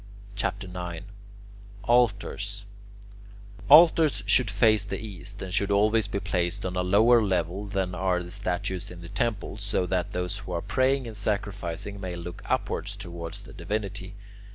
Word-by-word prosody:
CHAPTER 100 -1 -2
IX 90 -1 -6 0.8
ALTARS 105 -3 +1 1.0
Altars 155 - +7
should 110 +2 +4
face 105 +1 +4
the 100 - -4
east, 100 -2 -8
and 95 -1 -6
should 100 0 +1
always 105 +1 +3
be 100 - -2
placed 95 0 -1
on 90 0 -3
a 90 - +1
lower 110 +6 +5
level 95 0 -1
than 95 -2 -2
are 90 0 0
the 90 - -9
statues 95 +1 -3
in 90 -1 -10
the 85 - -9
temples, 110 -3 -2
so 100 -2 0
that 90 -1 -1
those 90 +2 -3
who 90 - -7
are 85 - -1
praying 130 0 +1
and 115 -2 -7
sacrificing 100 -2 -3
may 90 -2 -4
look 85 0 -7
upwards - - -1
towards 85 -4 -7
the - - -12
divinity. 100 -2 -4
100 Hz, 155 wpm, -27 LUFS, 90-105 Hz, 1.0 s, Altars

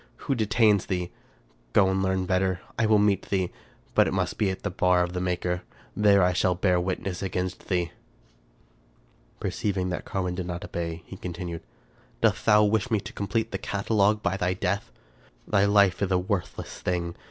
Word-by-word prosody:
Who 140 - +1
detains 110 -3 +3
thee? 90 -2 -2 0.6
Go 95 - +5
and 95 0 +1
learn 95 -1 0
better. 95 -1 +1 0.2
I 115 - +3
will 110 -1 +5
meet 105 -2 +2
thee, 95 -3 0 0.4
but - - +5
it - - -1
must - - -1
be 105 - +2
at 95 - -5
the 100 - -2
bar 90 0 +3
of 90 0 -4
thy 90 - -2
Maker. 90 0 -1 0.3
There 100 -3 +4
shall 90 +1 +2
I - - -10
bear 90 -1 +2
witness 90 0 -3
against 90 -1 -3
thee." 90 -4 0 1.5
Perceiving 95 -3 -1
that 90 - -3
Carwin 90 -2 -2
did 90 -1 -4
not 90 -1 -4
obey, 85 0 -4
he 95 - -10
continued, 85 -2 -5 0.3
" - - -32
Dost - - +2
thou 105 0 +7
wish 110 +4 +1
me 110 -3 +2
to - - -9
complete 110 +3 -2
the 95 - -3
catalogue 105 +1 +1
by 95 +2 0
thy 90 -1 0
death? 90 -8 -2 0.6
Thy 100 0 +3
life 100 -2 +4
is 100 - +1
a 95 - +3
worthless 90 0 -3
thing. 85 -2 -2
95 Hz, 185 wpm, -26 LUFS, 90-100 Hz, 1.5 s, thou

